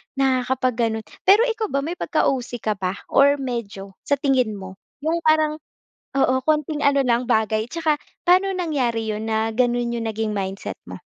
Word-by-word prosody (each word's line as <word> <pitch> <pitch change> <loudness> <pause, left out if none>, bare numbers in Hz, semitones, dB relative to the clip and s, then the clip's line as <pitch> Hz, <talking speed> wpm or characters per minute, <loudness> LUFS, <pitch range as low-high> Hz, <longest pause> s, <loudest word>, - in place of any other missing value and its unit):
nakakapag 260 -2 +1
ganon. 220 0 -3 0.2
Pero 410 +5 +7
ikaw 450 -3 -1
ba 275 -3 -1
may 340 +4 -5
pagka-OC 245 -3 -1
ka 215 - +1
ba 185 0 -2 0.2
or 280 +1 +5
medyo? 235 -8 -5 0.2
Sa 285 - +3
tingin 260 -6 +1
mo, 190 0 -10 0.2
'yong 325 +2 +1
parang 310 0 +3 0.6
oo, 260 -1 +3
konting 305 -1 0
ano 280 -1 +4
lang 240 0 +1
bagay 220 -1 +2
tsaka 325 -2 +1 0.3
paano 370 +2 +5
nangyari 250 -10 -1
yun 215 +1 -4
na 220 0 0
ganun 240 -1 +1
yung 230 - -3
naging 220 0 -2
mindset 195 0 -4
mo? - - -8
255 Hz, 165 wpm, -22 LUFS, 220-300 Hz, 0.6 s, Pero